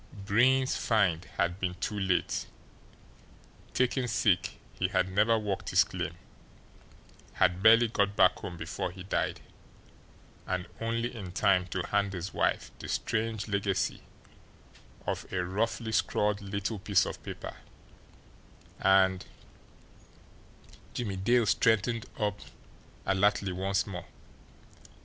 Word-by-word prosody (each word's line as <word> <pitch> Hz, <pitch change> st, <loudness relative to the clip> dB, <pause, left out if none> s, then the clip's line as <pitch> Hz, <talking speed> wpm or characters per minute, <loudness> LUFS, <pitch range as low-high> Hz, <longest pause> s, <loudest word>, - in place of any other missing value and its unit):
Breen's 120 Hz, +6 st, +2 dB
"find" 95 Hz, -7 st, +1 dB
had 85 Hz, +2 st, 0 dB
been 90 Hz, -2 st, -2 dB
too 105 Hz, +3 st, -3 dB
late; 95 Hz, -2 st, 0 dB, 1.3 s
taken 125 Hz, 0 st, +1 dB
sick, 95 Hz, -5 st, +1 dB
he -, -, 0 dB
had 95 Hz, 0 st, 0 dB
never 110 Hz, +4 st, +3 dB
worked 105 Hz, -3 st, -3 dB
his -, -, +5 dB
claim, -, -, -5 dB, 1.2 s
had 90 Hz, +1 st, +2 dB
barely 115 Hz, +3 st, +7 dB
got 100 Hz, -2 st, 0 dB
back 95 Hz, -, +4 dB
home 90 Hz, -3 st, -7 dB
before 85 Hz, +3 st, -3 dB
he 95 Hz, 0 st, -10 dB
died, 95 Hz, -, -1 dB, 1.1 s
and 90 Hz, -1 st, -2 dB
only 115 Hz, +2 st, -2 dB
in 95 Hz, -5 st, -7 dB
time 95 Hz, -1 st, +2 dB
to 90 Hz, 0 st, -3 dB
hand 100 Hz, -1 st, +1 dB
his 90 Hz, 0 st, -5 dB
wife -, -, 0 dB
the -, -, -7 dB
strange 110 Hz, -1 st, -1 dB
legacy 100 Hz, -2 st, -1 dB, 1.0 s
of -, -, -4 dB
a 90 Hz, -1 st, -1 dB
roughly 110 Hz, +4 st, -1 dB
scrawled 105 Hz, -1 st, +1 dB
little 100 Hz, +2 st, -3 dB
piece 100 Hz, 0 st, +3 dB
of -, -, -6 dB
paper, -, -, -7 dB, 1.2 s
and 95 Hz, -1 st, +3 dB, 1.7 s
Jimmie 105 Hz, -6 st, -3 dB
Dale 120 Hz, +5 st, +3 dB
straightened 115 Hz, +2 st, +2 dB
up 105 Hz, -1 st, -1 dB, 0.7 s
alertly 100 Hz, 0 st, +2 dB
once 95 Hz, +1 st, 0 dB
more. 90 Hz, -4 st, -6 dB
100 Hz, 115 wpm, -30 LUFS, 95-110 Hz, 1.7 s, barely